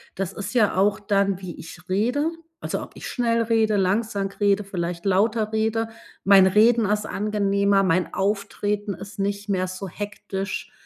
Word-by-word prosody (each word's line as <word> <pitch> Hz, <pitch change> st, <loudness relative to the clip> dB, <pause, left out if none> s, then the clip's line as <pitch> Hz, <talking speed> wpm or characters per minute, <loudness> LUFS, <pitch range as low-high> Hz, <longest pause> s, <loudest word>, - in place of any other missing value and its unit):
das 195 Hz, 0 st, -3 dB
ist 205 Hz, +3 st, -6 dB
ja 215 Hz, -4 st, +3 dB
auch 195 Hz, +2 st, +2 dB
dann, 200 Hz, -2 st, +1 dB
wie 185 Hz, -3 st, -7 dB
ich 175 Hz, +2 st, -11 dB
rede. 245 Hz, -, +1 dB, 0.3 s
Also, -, -, -3 dB
ob -, -, -9 dB
ich -, -, -7 dB
schnell 230 Hz, -2 st, +1 dB
rede, 220 Hz, -1 st, +2 dB
langsam 200 Hz, +1 st, 0 dB
rede, 205 Hz, 0 st, +3 dB
vielleicht 175 Hz, -2 st, -4 dB
lauter 215 Hz, +3 st, +2 dB
rede. 220 Hz, +1 st, 0 dB, 0.3 s
Mein 195 Hz, -1 st, +7 dB
Reden 220 Hz, +4 st, +4 dB
ist 210 Hz, +1 st, 0 dB
angenehmer, 200 Hz, -1 st, +1 dB
mein 185 Hz, -1 st, +1 dB
Auftreten 205 Hz, 0 st, -1 dB
ist 200 Hz, 0 st, -11 dB
nicht 200 Hz, +1 st, -2 dB
mehr 185 Hz, -2 st, 0 dB
so 185 Hz, +2 st, -6 dB
hektisch. 205 Hz, 0 st, -5 dB
200 Hz, 160 wpm, -24 LUFS, 195-215 Hz, 0.3 s, Mein